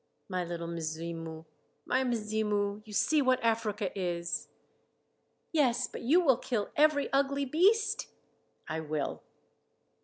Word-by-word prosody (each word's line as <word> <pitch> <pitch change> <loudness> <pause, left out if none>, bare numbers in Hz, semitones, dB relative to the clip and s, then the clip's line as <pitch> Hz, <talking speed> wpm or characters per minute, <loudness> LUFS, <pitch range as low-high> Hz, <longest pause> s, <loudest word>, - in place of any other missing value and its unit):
"My 185 -2 -1
little 170 -1 -5
Mzimu! 165 0 -5 0.4
My 265 - +2
Mzimu! 210 -3 -1
You - - -10
see 300 +9 +3
what 255 -1 +3
Africa 220 -3 0
is." 175 -2 -2 1.0
"Yes, 255 -6 +2
but - - -8
you 300 +9 +4
will 275 -9 +4
kill 235 -5 -2
every 300 -1 +4
ugly 280 0 +2
beast?" 415 - +2 0.6
"I 160 - -2
will." 155 -2 -3
215 Hz, 120 wpm, -31 LUFS, 170-275 Hz, 1.0 s, you